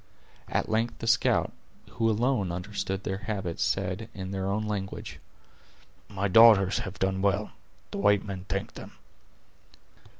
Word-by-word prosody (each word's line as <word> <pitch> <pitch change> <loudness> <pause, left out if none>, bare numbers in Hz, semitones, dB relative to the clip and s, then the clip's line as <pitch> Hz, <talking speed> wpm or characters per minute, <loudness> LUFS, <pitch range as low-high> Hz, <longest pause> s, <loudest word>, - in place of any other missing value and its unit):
At - - -1
length 115 +1 0
the - - -6
scout, 110 -1 +2 0.4
who 115 0 +1
alone 110 -3 +1
understood 95 +1 -4
their 95 0 -3
habits, 95 -6 -4
said, 95 +3 -1
in 95 -1 -6
their 95 -1 -2
own 100 +2 -1
language: 100 -2 -5 0.9
"My 100 -1 -1
daughters 105 -2 +6
have 95 -1 -6
done 95 0 0
well; 100 +1 +1 0.4
the - - -4
white 100 0 +3
men 95 -2 -6
thank - - -3
them." - - -10
100 Hz, 140 wpm, -28 LUFS, 95-110 Hz, 0.9 s, daughters